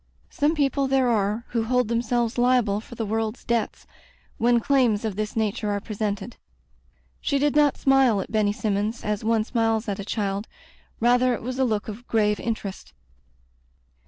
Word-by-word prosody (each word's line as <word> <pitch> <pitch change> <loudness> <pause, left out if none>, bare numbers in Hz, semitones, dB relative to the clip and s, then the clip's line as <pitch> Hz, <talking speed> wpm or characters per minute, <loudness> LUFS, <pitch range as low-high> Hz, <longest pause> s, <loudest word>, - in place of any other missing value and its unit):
Some 300 +3 +1
people 275 -2 +1
there 265 -2 +2
are 215 +1 0
who 230 -2 -1
hold 250 0 +1
themselves 235 +1 0
liable 240 -5 +2
for 235 - -12
die 225 - -3
world's 220 +2 -2
debts, 235 -2 -1 0.5
when 240 +1 +4
claims 235 -4 +2
of 215 -3 -2
this 210 +1 -3
nature 215 -1 -1
are 205 0 0
presented. 210 +2 -4 0.8
She 280 - 0
did 290 +1 +1
not 295 -2 +4
smile 270 -6 +4
at - - -5
Benny 215 -2 +2
Sinmions 210 +2 -2
as 210 0 -2
one 225 0 +2
smiles 225 -1 0
at 200 -1 -3
a - - -4
child; 200 0 -2 0.5
rather 245 +1 +3
it - - -9
was 255 +2 -4
a 265 - +3
look 215 -3 -1
of 225 +3 -8
grave 210 -2 +1
interest. 215 -4 -5
225 Hz, 170 wpm, -24 LUFS, 210-245 Hz, 0.8 s, when